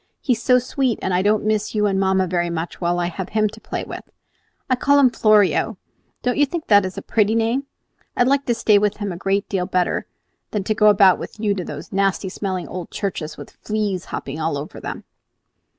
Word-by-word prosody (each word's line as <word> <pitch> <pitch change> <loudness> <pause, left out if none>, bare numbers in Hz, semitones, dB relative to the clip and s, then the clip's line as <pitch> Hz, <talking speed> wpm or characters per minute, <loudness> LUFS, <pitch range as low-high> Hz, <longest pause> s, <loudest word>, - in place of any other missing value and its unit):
"He 255 - +1
is 230 - -4
so 250 +2 +4
sweet 250 -1 -1
that 190 - -1
I 180 0 +2
don't 210 +1 +2
miss 215 0 0
you 210 0 +2
and 195 -2 +1
mamma 190 -1 +2
very 175 -1 -1
much 170 +1 -5
while 175 0 +1
I 175 - 0
have 180 +2 -5
him 215 -1 +2
to 220 +1 -13
play - - -4
with. - - -8 0.6
I 255 - +2
call 285 +3 +3
him 265 -3 +5
Florio, 215 -1 +3 0.5
don't 250 +2 0
you 290 - +6
think 330 +2 -4
that 205 -2 +5
is 185 - -9
a - - -5
pretty 215 0 +1
name? 230 +5 0 0.5
I - - +5
like 275 +2 +1
to 240 - +2
stay 210 -2 +4
with 210 0 0
him 205 -2 -3
a - - -5
great 195 +3 -1
deal 185 -3 -1
better 180 -2 0 0.4
than 210 -2 -2
to 215 - 0
go 215 0 +4
about 195 -3 +6
with - - -8
you 210 -2 +1
to 190 -2 -4
those - - -8
nasty 195 0 +1
smelling 185 -2 -4
old 180 -2 -6
churches, 160 -6 -4
with - - -10
fleas 210 -4 -3
hopping 140 +3 -6
all 155 -2 -1
over 145 +2 -7
them!" - - -6
205 Hz, 230 wpm, -21 LUFS, 185-220 Hz, 0.6 s, you